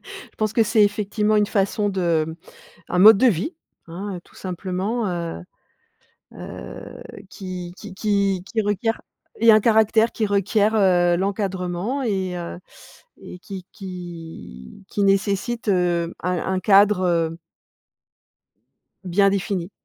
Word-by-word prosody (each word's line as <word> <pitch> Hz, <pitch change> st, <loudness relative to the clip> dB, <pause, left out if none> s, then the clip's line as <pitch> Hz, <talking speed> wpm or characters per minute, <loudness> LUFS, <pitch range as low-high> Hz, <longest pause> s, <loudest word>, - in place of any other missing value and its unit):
Je -, -, -12 dB
pense 215 Hz, -1 st, 0 dB
que 230 Hz, -, +3 dB
c'est 220 Hz, 0 st, +3 dB
effectivement 210 Hz, +1 st, 0 dB
une 210 Hz, 0 st, +3 dB
façon 205 Hz, 0 st, 0 dB
de 165 Hz, -4 st, 0 dB, 0.5 s
un 180 Hz, -, -1 dB
mode 210 Hz, +2 st, +9 dB
de 260 Hz, -, +4 dB
vie, 230 Hz, -, 0 dB, 0.3 s
hein, 185 Hz, +4 st, -6 dB
heu, -, -, -8 dB
tout -, -, -23 dB
simplement, 190 Hz, +5 st, -3 dB
heu 170 Hz, -, -4 dB, 0.9 s
heu, -, -, -9 dB, 0.3 s
qui 180 Hz, -3 st, -7 dB
qui 205 Hz, -2 st, -10 dB
qui 200 Hz, -2 st, 0 dB
qui 220 Hz, +3 st, -1 dB
requiert 205 Hz, +2 st, -1 dB, 0.4 s
et 230 Hz, +1 st, +7 dB
un 215 Hz, -, +7 dB
caractère 220 Hz, +1 st, +3 dB
qui 220 Hz, -, -1 dB
requiert, 205 Hz, +2 st, +1 dB
heu, 175 Hz, -4 st, +4 dB
l'encadrement 190 Hz, +4 st, -2 dB
et 190 Hz, -5 st, -1 dB
heu 170 Hz, 0 st, -6 dB, 0.6 s
et 180 Hz, -, -10 dB
qui 185 Hz, -1 st, -9 dB
qui 165 Hz, -, -10 dB
qui 205 Hz, -, -2 dB
nécessite, 200 Hz, +4 st, 0 dB
heu, 175 Hz, -3 st, +1 dB
un-un 180 Hz, +1 st, -1 dB
cadre, 200 Hz, 0 st, +5 dB
heu 165 Hz, -1 st, 0 dB, 1.7 s
bien 195 Hz, +2 st, +3 dB
défini. 195 Hz, -2 st, -2 dB
195 Hz, 130 wpm, -22 LUFS, 180-210 Hz, 1.7 s, mode